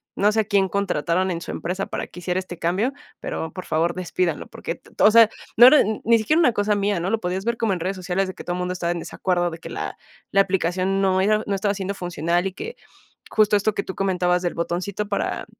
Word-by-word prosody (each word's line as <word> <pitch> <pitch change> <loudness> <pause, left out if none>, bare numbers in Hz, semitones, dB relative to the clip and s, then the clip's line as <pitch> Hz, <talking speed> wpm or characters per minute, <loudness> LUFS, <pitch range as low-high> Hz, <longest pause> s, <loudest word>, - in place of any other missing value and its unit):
no 205 +1 +3
sé, 220 - +3
a - - -2
quién 200 -2 +2
contrataron 185 -1 0
en 170 - -2
su - - -7
empresa 185 +3 -3
para - - -5
que - - -11
hiciera 180 +1 -1
este 180 -2 -8
cambio, 190 +10 0 0.3
pero, 160 - -4
por 185 - -6
favor, 165 +2 +1
despídalo 185 - -2
porque, - - -6
t - - -21
o 210 - +7
sea, 225 0 +7 0.3
no 240 +2 +10
era 295 +3 +8
n 215 +1 -1
ni 230 +1 +5
siquiera 305 +10 +2
una 300 - +5
cosa 205 0 +1
mía, 200 -2 0
¿no? 175 +3 -2
Lo 225 +1 0
podías 185 +2 -3
ver 235 0 +1
como 225 -3 0
en 180 - -3
redes 185 +4 -2
sociales 185 +1 -1
de 185 - -5
que - - -9
todo 175 - -3
mundo 180 0 -2
estaba 170 -1 -2
en 175 - -2
desacuerdo, 175 +1 -1
de 165 0 -8
que - - -9
la - - -5 0.3
la 195 - +5
aplicación 190 0 0
no 190 -1 +2
era 215 +2 +3
no 200 - 0
estaba 200 +1 0
siendo 195 0 -3
funcional 175 0 -1
y - - -4
que, 455 - -7 0.6
justo 215 -1 +4
esto 210 +1 0
que 200 - -1
tú 190 - -7
comentabas 180 -2 +1
del 175 - -2
botoncito 185 +5 -3
para, 200 - -2
190 Hz, 250 wpm, -23 LUFS, 180-205 Hz, 0.6 s, no